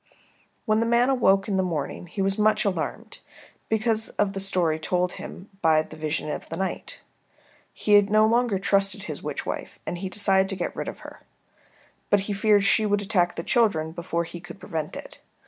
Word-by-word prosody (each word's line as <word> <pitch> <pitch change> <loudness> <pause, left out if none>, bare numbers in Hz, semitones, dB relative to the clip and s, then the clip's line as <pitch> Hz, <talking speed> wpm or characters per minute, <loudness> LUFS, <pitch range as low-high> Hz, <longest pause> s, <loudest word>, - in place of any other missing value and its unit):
When 215 0 +2
the 230 - +1
man 240 +3 +3
awoke 195 -7 +3
in 200 -2 0
the - - +3
morning 175 -1 -3
he 195 +3 -3
was 195 +1 0
much 215 0 +3
alarmed 185 -5 -3 0.5
because 220 0 0
of 200 -1 +1
the 195 - -4
story 180 -5 +1
told 180 +2 0
him 185 +3 -9
by 155 -1 +4
the 155 - -12
vision 155 0 -3
of - - -6
the 165 - -5
night. 190 0 -4 0.7
He 205 -1 +4
no 215 +2 +3
longer 230 -2 +2
trusted 195 0 +1
his - - -6
witch - - -4
wife - - -5
and 175 - -4
he 190 0 -4
decided 190 -1 +2
to 195 - -3
get 180 - -3
rid - - -4
of - - -7
her. - - -11 0.9
But 205 - +4
he 205 +1 -3
feared 205 0 +3
she 220 - +4
would 205 0 +1
attack 185 -4 +1
the 165 - -4
children 180 -11 +2
before 170 0 -2
he 170 +1 -8
could 175 +3 -11
prevent 160 -6 -4
it. - - -10
195 Hz, 200 wpm, -25 LUFS, 175-210 Hz, 0.9 s, by